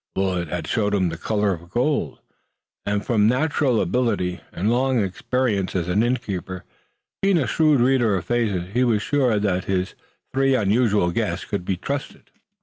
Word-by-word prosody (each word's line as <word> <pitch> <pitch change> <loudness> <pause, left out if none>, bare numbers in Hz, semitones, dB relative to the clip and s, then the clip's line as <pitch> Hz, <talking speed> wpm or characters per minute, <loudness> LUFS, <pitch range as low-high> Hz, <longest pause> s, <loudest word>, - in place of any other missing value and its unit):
Willet 90 -3 -1
had 85 0 -4
shown 105 +1 0
him 95 -3 +1
the 85 - -5
color 105 0 0
of 85 0 -10
gold, 120 - -1 0.7
and 100 0 -1
from 105 -3 +3
natural 130 -1 +1
ability 95 -3 0
and 100 +6 -1
long 130 +1 +2
experience 100 +1 -1
as 85 -2 -1
an 90 +4 +2
innkeeper 100 -7 -2 0.6
being 195 -2 +3
a 145 - +1
shrewd 150 +4 +3
reader 120 -4 +3
of 85 - -5
faces 100 -5 -1
he 125 +2 +2
was 115 -4 +1
sure 130 -6 +1
that 95 -3 0
his 95 -1 -1 0.4
three 135 0 +3
unusual 105 -4 +2
guests - - -2
could 90 - -4
be 95 -1 -1
trusted. 140 +8 -5
105 Hz, 165 wpm, -22 LUFS, 95-125 Hz, 0.7 s, from